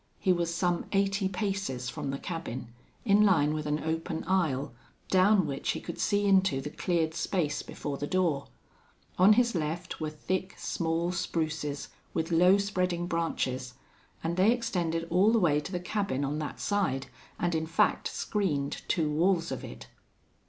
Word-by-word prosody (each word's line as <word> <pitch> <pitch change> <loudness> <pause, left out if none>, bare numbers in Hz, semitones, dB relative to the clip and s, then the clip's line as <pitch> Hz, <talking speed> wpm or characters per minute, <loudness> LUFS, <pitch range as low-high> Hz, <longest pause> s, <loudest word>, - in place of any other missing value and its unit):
He 185 - +3
was 170 -1 -1
some 175 0 0
eighty 195 0 +2
paces 190 - -2
from 130 - -4
the 135 - -2
cabin, 135 - -5 0.4
in 205 -1 +5
line 160 -7 +4
with 155 -1 -3
an 150 +1 -1
open 160 +1 -2
aisle 150 -8 0 0.4
down 190 0 +5
which 140 -2 -2
he - - -4
could - - -7
see 205 0 +1
into 190 -8 +4
the 150 +2 -5
cleared 165 -3 0
space 160 -3 -1
before 140 -1 -5
the 145 - -2
door. 170 -6 +1 0.7
On 195 +4 +8
his 235 +1 +3
left 170 +1 -3
were 155 - -1
thick, 185 +5 -3
small 165 +1 -1
spruces, 155 -5 -2 0.3
with 165 +1 -1
low 180 +4 +6
spreading 185 -3 -1
branches, 130 -7 -2 0.5
and 170 +2 -1
they 195 +5 +5
extended 175 -9 -1
all 190 +5 +5
the 230 - +4
way 160 -8 +3
to 150 - -7
the 180 - -2
cabin 180 -6 -1
on 145 +2 -2
that 150 - -5
side, 185 -11 0 0.3
and 175 -1 0
in 160 0 -1
fact 165 - +2
screened 150 -10 -1
two 165 -4 +1
walls 165 +2 +1
of 130 - -4
it. - - -9
170 Hz, 165 wpm, -29 LUFS, 150-190 Hz, 0.7 s, On